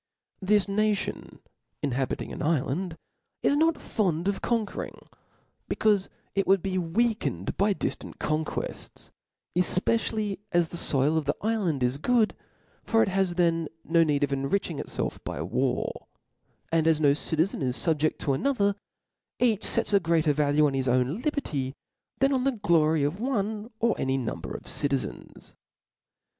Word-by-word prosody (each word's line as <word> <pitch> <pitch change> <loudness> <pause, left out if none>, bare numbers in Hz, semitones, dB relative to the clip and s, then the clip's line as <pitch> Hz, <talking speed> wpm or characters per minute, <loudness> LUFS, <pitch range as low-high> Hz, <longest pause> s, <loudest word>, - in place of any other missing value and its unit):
This 205 +1 +3
nation 210 0 -1 0.4
inhabiung 135 -1 -2
an - - -7
ifland 160 +3 0 0.5
is 285 - +3
not 320 +1 +2
fond 180 -5 -1
o( - - +4
conquering, 225 -4 -2 0.7
becaufe 205 -3 +2 0.3
it 195 - 0
would 195 -2 +4
be 185 -1 0
weakened 180 - -1
by 200 +1 +2
di - - -1
ftant - - -9
conquefts: 155 0 -4 0.4
efpecially 205 +3 +1
as 170 -2 +2
the 175 - -5
foil 150 +1 +2
of 155 - -6
the 145 - 0
ifland 195 - 0
is 125 +3 0
good; 235 +4 +2 0.5
for 225 -1 +3
it - - 0
has 190 -2 +1
th^n 165 -2 +2 0.2
no 165 0 +4
need 145 -2 +1
of 140 -1 0
enriching 135 +9 -1
it - - -5
felf - - -4
by - - -5
war; - - -1 0.6
and 165 -1 +2
as 160 -2 +4
no 145 -2 +5
citizen 160 +4 0
is 125 -1 0
fubjed 155 -2 +1
to 140 - 0
another, 205 - +1 0.7
each 225 -4 +3
fets 230 -2 +1
a 200 - +6
greater 165 -3 +2
value 150 +1 +3
on 140 - +1
his 135 -1 -1
ov^n 130 - +1
liberty, 150 - -2 0.4
than 275 +1 +3
on 255 -1 +1
the 275 0 +2
glory 160 -8 +2
of 150 +7 -1
one» 220 -3 -2
or 230 -1 +3
any 135 0 +1
number 125 -4 -4
of - - -15
citizens. 140 -2 -3
175 Hz, 155 wpm, -27 LUFS, 150-215 Hz, 0.7 s, a